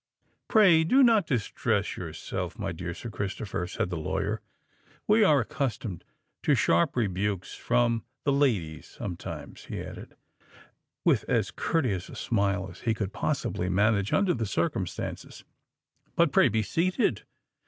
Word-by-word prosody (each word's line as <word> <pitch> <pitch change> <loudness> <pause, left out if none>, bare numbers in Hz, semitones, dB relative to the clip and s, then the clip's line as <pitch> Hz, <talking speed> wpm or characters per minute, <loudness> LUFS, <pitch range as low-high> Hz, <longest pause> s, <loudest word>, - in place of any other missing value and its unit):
"Pray 185 -8 +6
do 260 +12 +5
not 225 -4 +5
distress 120 -8 0
yourself, - - -5
my - - -3
dear 85 -1 -5
Sir 115 +6 -7
Christopher," 100 -3 -3
said 90 - -2
the 85 - -2
lawyer. 80 - -2 0.7
"We 215 +1 +5
are 150 -8 +5
accustomed 115 - -3 0.4
to - - +3
receive - - +2
sharp 85 +1 +3
rebukes 100 -4 -1
from 120 -1 +1 0.2
the 140 - +2
ladies 105 - +1
sometimes," 90 -4 -7
he - - -5
added, - - -9 0.9
with - - +4
as - - +1
courteous 115 - -1
a - - -9
smile 100 -3 0
as 90 - -13
he 115 -2 0
could 105 -3 -3
possibly 90 - -1
manage 100 +1 +2
under 195 -3 +3
the 115 -7 -2
circumstances. - - -3 0.7
"But 170 -3 +4
pray 130 - +5
be 110 0 +1
seated. 185 - +1
110 Hz, 145 wpm, -28 LUFS, 95-145 Hz, 0.9 s, Pray